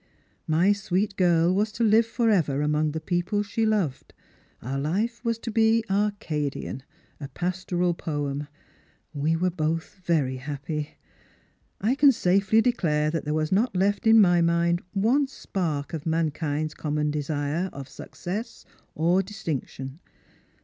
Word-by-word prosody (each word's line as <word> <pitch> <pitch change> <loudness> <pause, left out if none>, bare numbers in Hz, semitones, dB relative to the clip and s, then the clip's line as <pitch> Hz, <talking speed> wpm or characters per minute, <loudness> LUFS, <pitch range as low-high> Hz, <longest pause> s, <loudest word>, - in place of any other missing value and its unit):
My 170 +6 +4
sweet 200 0 -1
girl 175 -2 +3
was 210 +3 +1
to 230 - -1
live 220 +1 +4
for 230 -1 +1
ever 150 -8 +1
among 150 0 +1
the 160 - -2
i^eople 180 +5 -1
she 220 +2 0
loved. 195 -11 -1 0.4
Our 135 +3 -4
life 205 - -1
was 230 -2 0
to 230 0 -6
be 225 +1 +3
Arcadian 165 -10 -2 0.2
— - - -35
a 140 - -4
pastoral 180 +3 -1
poem. 145 -3 -3 0.7
We 150 +2 0
were 180 +2 +1
both 165 +4 -3
very 145 -7 +1
happy. 145 +2 -5 0.8
I 220 +6 +2
can 280 0 +6
safely 195 0 +3
declare 155 -11 +1
that 165 -1 -3
there 150 +1 -1
was 155 0 -1
not 205 +2 +2
left 200 +5 +1
in 225 0 +7
my 175 -4 +5
mind 170 +1 +2
one 240 +8 +2
spark 170 - -3
of 160 -1 -4
mankind's 155 -1 -1
common 150 0 -1
desire 150 +4 -2
of 140 -1 -8
success 200 - -7 0.3
or 170 +4 +3
distinction. 155 -8 -5
175 Hz, 145 wpm, -26 LUFS, 150-205 Hz, 0.8 s, in